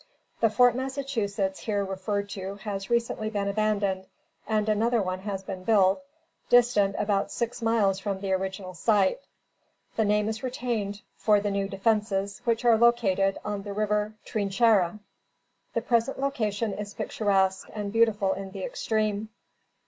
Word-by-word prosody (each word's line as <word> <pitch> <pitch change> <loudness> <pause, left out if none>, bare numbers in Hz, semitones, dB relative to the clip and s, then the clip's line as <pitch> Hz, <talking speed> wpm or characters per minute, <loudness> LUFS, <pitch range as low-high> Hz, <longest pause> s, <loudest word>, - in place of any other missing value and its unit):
The 225 - +4
Fort 245 +2 +5
Massachusetts 240 -8 -2
here 205 -2 -1
referred 200 +1 -2
to 195 0 -5
has 195 -1 -5
recently 235 -2 0
been 205 -2 -2
abandoned 200 -2 0 0.4
and 215 -1 +1
another 225 +3 +2
one 185 -2 -2
has 195 -1 -4
been 190 -1 -6
built, 195 +1 +4 0.5
distant 235 -5 +4
about 200 -1 0
six 235 0 -3
miles 215 -4 +2
from 195 -1 -3
the 195 -1 -3
original 190 0 -3
site. 195 +1 +2 0.8
The 220 - +3
name 210 0 +2
is 220 0 -3
retained 235 -5 -3
for 210 -1 +4
the 205 0 -1
new 200 0 0
defences, 200 0 0
which 230 0 +1
are 230 -2 +5
located 205 -5 +3
on 205 -1 -2
the 200 0 -6
river 210 +1 0
Trinchera. 205 -2 +2 0.8
The 230 - +1
present 235 +3 +1
location 225 -6 -1
is 205 0 -6
picturesque, 190 -3 0
and 205 -1 -4
beautiful 215 -4 +3
in 195 0 -6
the 190 -1 -7
extreme. 215 -1 -1
210 Hz, 150 wpm, -27 LUFS, 195-225 Hz, 0.8 s, Fort